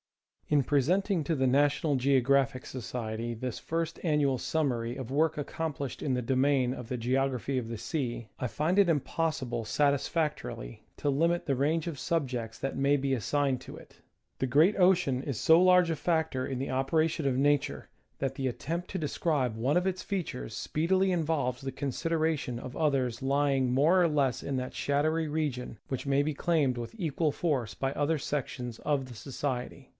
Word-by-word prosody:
In 145 -2 +3
presenting 170 - +1
to 165 - 0
the 130 -2 +2
National 145 +3 +2
Geographic 135 0 +2
Society 115 -2 -4
this 125 +1 -4
first 165 0 -3
an 155 -4 +2
nual 140 -3 +2
summary 125 -5 -1
of 130 -3 -6
work 155 +2 +2
accomplished 145 -2 -4
in 135 - 0
the 125 -1 -1
domain 130 0 +2
of 125 -3 -8
the 125 - -2
Geog 130 +3 +1
raphy 130 +2 -2
of 115 -3 -3
the 115 - -4
Sea, 120 0 -3
I 125 - -2
find 155 - 0
it 195 -3 +5
impossible 140 -6 -1
satisfactorily 145 - -1
to 145 - -1
limit 170 +5 +1
the 140 - +1
range 150 +5 0
of 165 -4 -4
subjects 125 -9 -2
that 135 - -3
may 140 +2 +3
be 135 0 0
assigned 135 +1 0
to - - -10
it. - - -16 0.4
The 130 - 0
great 155 - +4
ocean 180 -8 +3
is 140 -6 -3
so 160 +2 +6
large 180 -1 +5
a 165 - +1
factor 160 -6 0
in 130 -2 -3
the 135 - -3
operations 155 +4 +1
of 130 -2 +1
Nature, 145 +1 +1 0.3
that 135 -1 -2
the 135 -1 -1
attempt 165 +8 -4
to 190 - -3
describe 145 -6 0
one 130 +8 +1
of 180 +1 +1
its 185 -1 -1
features 170 - -4
speedily 185 +5 +1
involves 150 -7 0
the 135 0 -4
consideration 150 -1 -1
of 125 0 -8
others 135 -6 0
lying 135 -1 +2
more 155 +8 +4
or - - +4
less 140 -5 +1
in 135 -2 -2
that 125 0 -4
shadowy 155 +3 0
region 145 -7 -2
which 135 +1 -4
may 140 +1 +3
be 155 +1 -1
claimed 145 -5 +1
with 120 -1 -5
equal 160 -4 0
force 135 -10 -1
by 135 0 -2
other 145 +3 +1
sections 125 -4 -4
of 145 -3 0
the 125 -2 -11
Society. 130 +1 -4
140 Hz, 180 wpm, -29 LUFS, 130-160 Hz, 0.4 s, so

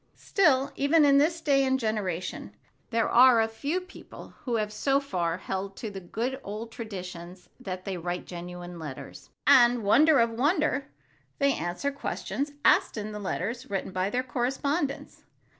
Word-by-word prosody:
Still, 280 -8 +2
even 295 +2 +4
in 280 -1 +6
this 330 +3 +1
day 275 -3 +3
and 265 0 +1
generation, 205 -6 -3 0.3
there 230 -1 +1
are 250 -1 +6
a 225 - +3
few 280 +10 -2
people 370 +1 -12 0.2
who 245 -3 0
have 210 -1 -1
so 275 +6 +2
far 175 -11 -2
held 195 +1 -5
to 220 - -5
the 195 - -6
good 240 +9 -4
old 215 +3 -6
traditions 180 -5 -8
that 185 -1 -6
they 190 -2 -3
write 175 +1 -4
genuine 175 0 -8
letters. 150 -5 -9 0.2
And—wonder 245 +5 +5
of 230 0 +3
wonders!—they 280 0 -1
answer 175 - -2
questions 285 0 -4
asked - - +4
them 215 -1 -5
in 210 - -6
letters 230 +7 -3
written 195 -1 -3
by 185 +1 -1
their 250 +4 -1
correspondents. 275 +4 -2
230 Hz, 155 wpm, -27 LUFS, 190-275 Hz, 0.3 s, in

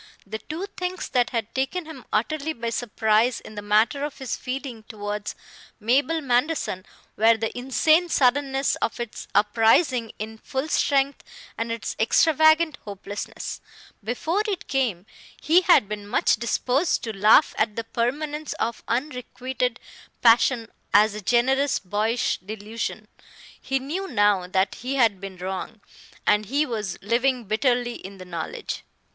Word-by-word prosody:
The 220 +2 -5
two 325 - -5
things 360 0 -3
that 245 -2 +2
had 230 -2 -3
taken 270 +7 -1
him 315 0 -10
utterly 310 0 0
by 230 -2 -4
surprise 225 0 +1
in - - -12
the 205 - -6
matter 215 +7 +2
of 295 -1 -4
his 265 -2 -3
feeling 255 -3 -5
towards 205 -1 -4 0.4
Mabel 280 +9 +2
Manderson 250 - 0 0.3
were 225 +1 +5
the 225 0 -3
insane 310 +7 +3
suddenness 270 0 +2
of 230 - -2
its 240 -2 -6
uprising 225 +3 +3
in 220 +1 -6
full 265 +6 -3
strength 280 -1 +1 0.3
and 230 0 -3
its 230 -1 -4
extravagant 315 +5 +4
hopelessness. 205 0 -6 0.4
Before 315 - -1
it 395 -4 -3
came, 230 -10 0 0.3
he 335 +4 +4
had 345 - +5
been 205 0 -6
much 205 - +2
disposed 250 +7 0
to 225 -2 -4
laugh 215 +9 +5
at 215 -1 +1
the 230 - -3
permanence 290 +7 -2
of 230 0 -3
unrequited 250 -1 -2 0.4
passion 230 0 +4 0.3
as 210 +1 +6
a 210 - -6
generous 260 +6 +2
boyish 215 +5 -1
delusion. 215 +4 -5 0.5
He 270 - 0
knew 315 +9 -4
now 205 - +2
that 190 +1 +1
he 260 +3 -2
had 225 -7 +3
been 195 -1 -7
wrong, 190 +4 -5 0.5
and 210 0 +3
he 285 +6 +1
was 215 -8 -4
living 245 +4 +1
bitterly 240 +3 +1
in 195 +1 -10
the 185 - -10
knowledge. 170 -3 -5
240 Hz, 145 wpm, -24 LUFS, 215-275 Hz, 0.5 s, as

